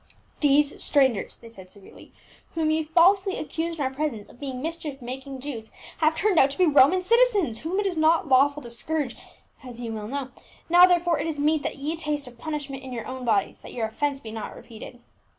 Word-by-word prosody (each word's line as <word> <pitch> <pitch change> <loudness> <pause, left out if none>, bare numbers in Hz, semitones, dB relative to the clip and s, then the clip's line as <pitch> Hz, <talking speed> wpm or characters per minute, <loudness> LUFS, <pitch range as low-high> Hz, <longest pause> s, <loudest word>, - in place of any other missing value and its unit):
"Those 290 0 +2
strangers," 265 -8 +1
they 230 - -14
said 190 -5 -14
severely, 200 0 -16 0.4
"whom 315 -1 +1
ye 315 +1 +1
falsely 375 +4 +3
accused 330 +2 -4
in 285 - -1
our 260 - -2
presence 265 -7 -3
of 245 - -17
being 265 -3 -5
mischief 310 -2 -5
making 265 +2 -7
Jews 240 -6 -6 0.3
have 315 0 +3
turned 390 -1 +2
out 270 - +5
to 275 - -5
be 365 - +4
Roman 310 +4 +5
citizens, 415 - +3
whom 355 +5 -2
it 410 - 0
is 365 -4 -1
not 320 +3 +3
lawful 285 +2 +3
to 235 - -9
scourge, 285 +1 -3 0.5
as 245 -2 -10
ye 235 -2 -5
well 215 -1 -5
know: 270 +1 -4 0.4
now 350 +2 +8
therefore 345 -2 +2
it - - -2
is 310 -3 -4
meet 305 +1 +2
that - - -4
ye 295 +4 -3
taste 300 -3 -2
of 245 -1 -14
punishment 290 -3 -5
in 265 -1 -9
your 230 -2 -5
own 260 -1 -6
bodies, 210 -4 0
that - - -11
your 230 -2 -2
offence 280 +5 -2
be 225 -4 -9
not 220 -1 -6
repeated." 235 +1 -11
285 Hz, 215 wpm, -25 LUFS, 250-325 Hz, 0.5 s, now